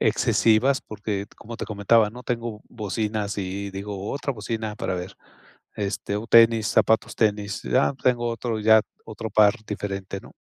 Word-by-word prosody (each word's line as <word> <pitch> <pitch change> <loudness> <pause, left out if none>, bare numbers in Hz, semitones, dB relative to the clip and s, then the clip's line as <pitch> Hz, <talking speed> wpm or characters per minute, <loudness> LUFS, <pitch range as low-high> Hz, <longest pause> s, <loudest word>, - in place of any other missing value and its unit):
excesivas, 125 +5 +3
porque, 105 -1 -4
como 115 +1 -9
te - - -5
comentaba, 105 +1 +3
¿no?, 125 +2 -10
tengo 115 -3 -4
bocinas 105 -1 -3
y 100 +1 -4
digo: 100 +1 -5
"Otra 140 0 -2
bocina 110 -1 -4
para 95 - -2
ver", 90 +2 -6 0.6
este, 100 0 -2
o 110 +2 -5
tenis, 115 -1 +6
zapatos 110 - +2
tenis, 105 -2 0
ah, 130 - +4
tengo 120 -2 +2
otro 115 -1 -3
ya, 110 0 +6 0.2
otro 110 0 -6
par 105 0 +5
diferente, 100 -2 -4
¿no? - - -15
110 Hz, 155 wpm, -24 LUFS, 100-115 Hz, 0.6 s, tenis